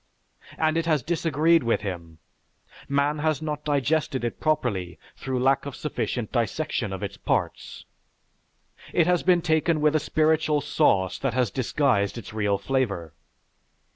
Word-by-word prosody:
And 160 0 +1
it 165 0 -1
has 155 -6 +2
disagreed 165 0 +2
with 115 -4 0
him; 85 -5 -6 0.7
man 140 +2 +1
has 155 -2 0
not 150 -1 -4
digested 145 -2 0
it 120 - -3
properly 100 - -1 0.2
through 130 -1 -3
lack 135 +1 +2
of 140 - -6
sufficient 125 -6 -3
dissection 120 -1 -1
of 95 +1 -5
its 100 - -5
parts. - - -2 1.1
It 170 - +4
has 180 0 +2
been 180 -2 +3
taken 160 -1 +2
with 150 0 +2
a - - +4
spiritual 155 0 +2
sauce 130 - +1
that 135 -3 -1
has 125 -5 +1
disguised 125 -5 0
its 105 -3 -8
real 105 -2 +1
flavor. 100 - -2
140 Hz, 145 wpm, -25 LUFS, 110-155 Hz, 1.1 s, It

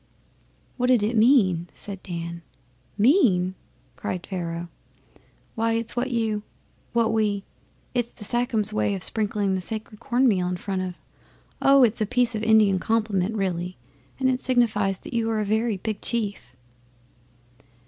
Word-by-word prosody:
'What 250 -1 +1
did 250 -4 +4
it 220 +3 0
mean?' 215 -8 +4
said 195 -2 -6
Dan. 170 -1 -6 0.6
'Mean!' 205 - +4 0.4
Pharaoh 185 - -3
cried. 170 -2 -5 0.9
'Why 225 0 0
it's 230 0 -2
what 245 +2 0
you 225 -3 0 0.5
what 230 -1 +2
we 210 -3 +1 0.5
it's 240 -1 -1
the 215 - -12
Sachems' 220 -2 0
way 205 -1 +1
of 185 - -5
sprinkling 205 -2 0
the 190 - -1
sacred 215 +1 -5
corn 250 +2 +2
meal 185 -6 +2
in 180 0 -2
front 190 +1 -3
of 185 -1 -4 0.7
oh! 275 -1 +6
it's 230 -1 +2
a 215 - +1
piece 245 0 +1
of 215 - -2
Indian 215 -4 +4
compliment 215 -2 0
really, 180 -3 -2 0.4
and 265 - +2
it 255 0 +1
signifies 215 -6 +1
that 310 +5 -11
you 230 -1 0
are 220 -1 0
a 210 - 0
very 220 +1 +1
big 215 +1 -4
chief. 200 - -3
215 Hz, 155 wpm, -25 LUFS, 190-235 Hz, 0.9 s, oh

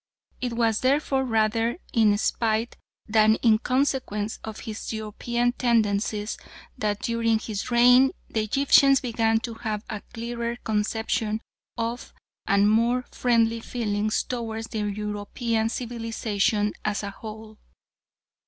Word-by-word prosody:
It 245 -2 -2
was 230 -2 +1
therefore 270 0 +1
rather 225 +1 +1 0.2
in 215 -3 +4
spite, 225 +2 0 0.3
than 220 0 +4
in 220 -2 +5
consequence 255 -5 -1
of 220 -1 -7
his 220 -2 -6
European 235 +3 -1
tendencies 215 -3 0 0.4
that 210 -4 -2
during 230 -1 +1
his 215 -1 -5
reign 245 +2 +6 0.2
the 220 - -1
Egyptians 275 +4 +5
began 225 -2 +1
to 235 - -5
have 220 -2 -4
a 210 -2 -4
clearer 235 0 -4
conception 220 0 -1 0.4
of 230 +1 -4 0.3
and 200 +1 +4
more 235 +4 +2
friendly 230 -2 +2
feelings 215 -3 -1
towards 225 -2 -5
European 210 +2 -2
civilisation 225 -3 -1
as 210 -1 -1
a 200 - -4
whole. 215 +1 -10
225 Hz, 115 wpm, -25 LUFS, 215-235 Hz, 0.4 s, reign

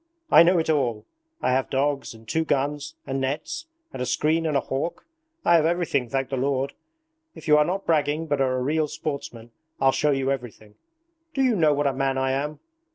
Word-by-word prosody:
I - - +9
know 175 +2 +5
it 160 - 0
all! 125 -9 0 0.4
I - - +2
have 130 +1 +1
dogs, 140 -2 -1
and 110 0 -16
two 160 +6 +1
guns, 145 0 -1
and 135 0 -2
nets, 150 - -3 0.3
and - - -5
a - - 0
screen 155 +6 +1
and 150 -2 +1
a - - +1
hawk. 135 +7 -4 0.4
I - - +5
have 160 - +2
everything, 165 -8 0
thank 135 +1 -1
the 135 - -2
Lord! 135 +1 0 0.6
If - - -11
you 150 - +6
are 150 - +4
not 190 +4 -2
bragging 155 0 +1
but 145 -3 0
are 130 -1 +1
a - - -1
real 155 +3 +1
sportsman, 120 -6 -6 0.3
I'll 135 0 +4
show 150 - +1
you 135 -1 +1
everything. 120 -5 -6 0.6
Do 270 - +2
you 250 -3 +3
know 155 -5 +3
what 145 +1 0
a 140 - +2
man 135 0 0
I 130 0 +1
am? 145 +3 -2
140 Hz, 215 wpm, -25 LUFS, 130-155 Hz, 0.6 s, I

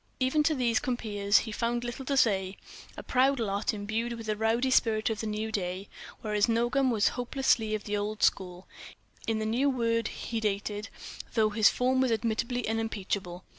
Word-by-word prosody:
Even 260 +4 +2
to 310 +1 +2
these 240 -3 +2
compeers 210 -6 +1
he 220 - -6
found 235 +2 -1
little 240 +2 -5
to 275 +1 0
say: 195 -6 +2 0.4
a - - -8
loud 265 +1 +4
lot, 205 -2 0
imbued 220 +3 -3
with 230 -1 -7
the 215 -1 -1
rowdy 225 +4 +1
spirit 220 -3 +2
of 220 - -3
the 220 - -3
new 215 +1 -3
day; 190 -1 -3 0.3
whereas 210 -1 +1
Nogam 240 +4 +2
was 225 -3 +3
hopelessly 245 -3 0
of 215 - -5
the 210 - -2
old 205 +1 -3
school—in 185 +4 -3
the 215 - -2
new 245 +6 +2
word, 230 -3 0
he 230 - -4
dated—though 210 +1 -2
his 215 0 +5
form 260 +1 +1
was 260 -2 +2
admittedly 230 +2 -1
unimpeachable. 200 -5 -3
225 Hz, 170 wpm, -29 LUFS, 210-240 Hz, 0.4 s, his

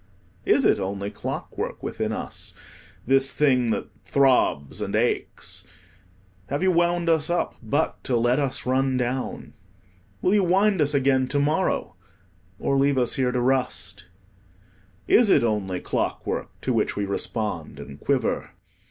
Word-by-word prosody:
Is - - +3
it - - +4
only 100 +1 -3
clockwork - - -5
within - - -2
us, - - -5 0.5
this 135 +1 +3
thing 130 -5 +2
that - - -2
throbs 130 - +2
and - - -2
aches? - - -1 0.8
Have 140 +6 -2
you 190 - +4
wound 175 0 +1
us 160 -2 +2
up 175 0 0
but 140 +8 -1
to 125 - +1
let 120 +3 +2
us 140 -3 -1
run 130 0 +1
down? 125 +1 -3 0.7
Will 185 - +2
you 205 -2 +4
wind 190 +1 +3
us 145 0 +1
again 130 -1 +3
to 145 +2 0
morrow, 155 +6 0 0.6
or 135 - 0
leave 140 0 +3
us 125 -2 +2
here 130 -3 +1
to 125 - 0
rust? 115 -7 -1 1.0
Is 235 -3 +5
it 140 - +5
only 100 -5 -1
clockwork - - -2
to - - -1
which - - 0
we 100 - -1
respond 100 -6 -3
and 70 0 -10
quiver? 130 - -1
130 Hz, 145 wpm, -24 LUFS, 115-150 Hz, 1.0 s, Is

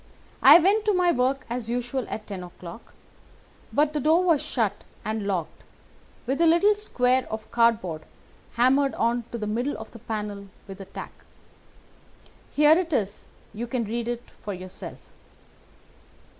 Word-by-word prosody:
I - - +10
went 395 +5 +3
to 420 -2 +3
my 360 -1 +3
work 260 0 0
as 240 -1 -4
usual 245 +1 -2
at 215 - -5
ten 195 -3 -6
o'clock, 175 +3 -11 0.8
but 295 +1 +2
the 300 - 0
door 320 +5 +3
was 330 -5 +3
shut 210 -5 -1 0.2
and 215 -1 -2
locked, 175 -5 -3 0.6
with 270 +6 -1
a 335 - +6
little 345 +6 +5
square 260 -11 +1
of 220 0 -6
cardboard 230 -9 +2 0.5
hammered 270 +3 +3
on 235 0 0
to 235 - -4
the 215 - -4
middle 240 +7 -2
of 220 - -9
the 230 - -12
panel 210 -3 -5 0.2
with 195 0 -9
a - - -8
tack. - - -8 1.4
Here 300 +1 +5
it 345 -2 -3
is, 205 -8 -1 0.3
and 210 - -11
you 240 - -3
can 235 0 -1
read 235 +2 -3 0.2
for 205 -2 -4
yourself." 185 0 -8
240 Hz, 155 wpm, -25 LUFS, 210-285 Hz, 1.4 s, I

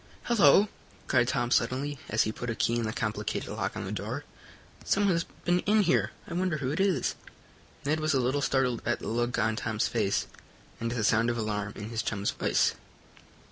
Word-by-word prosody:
Hello!" 205 - +5 0.4
cried 125 -3 +3
Tom 120 -2 0
suddenly, 130 +4 +1
as 110 - +3
he 110 - -1
put 120 +2 -5
a 115 - -1
key 115 - +1
in 115 - -1
the 110 - -1
complicated 110 -4 -3
lock - - -3
on - - -4
the - - -5
door, - - -4 0.6
"someone 200 0 +2
has 170 0 0 0.2
been 175 0 +3
in 210 +3 +3
here. 175 -1 +2 0.2
I - - -6
wonder 180 -2 0
who 135 -2 -2
it 155 - -2
is?" 195 -2 +2 0.7
Ned 155 +2 +1
was 155 -1 +1
a - - +3
little 130 +3 +1
startled 135 -4 +1
at 120 - 0
the - - -8
look 120 +2 0
on 110 -1 +1
Tom's 110 -1 0
face 105 -4 0 0.5
and 115 - -2
the 115 -2 -1
sound 110 +3 +3
of 120 - -1
alarm 105 -2 -2
in 105 +1 -6
his 115 -1 -1
chum's 100 -2 -1
voice. - - +2
120 Hz, 205 wpm, -29 LUFS, 110-155 Hz, 0.7 s, Hello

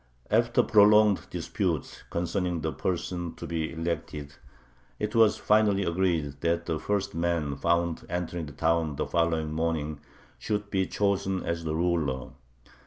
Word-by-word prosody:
After 115 +2 +3
prolonged 105 -1 +5
disputes - - -2
concerning 90 0 -1
the - - -1
person 85 -1 -3
to - - -7
be 80 -1 -2
elected, 75 -3 -4 0.6
it 105 0 -3
was 115 -2 +5
finally 105 -2 +3
agreed 85 -6 0
that 85 0 0
the 80 -2 -2
first 100 +5 -1
man 85 -4 0
found 85 +3 0
entering 85 -2 -3
the - - -8
town 80 0 +1
the - - -1
following 80 -2 0
morning 80 -2 -1 0.4
should 105 -1 -3
be 95 -2 +1
chosen 95 -2 0
as 85 -1 -3
the 80 0 -1
ruler. 80 -7 0
85 Hz, 140 wpm, -28 LUFS, 80-95 Hz, 0.6 s, prolonged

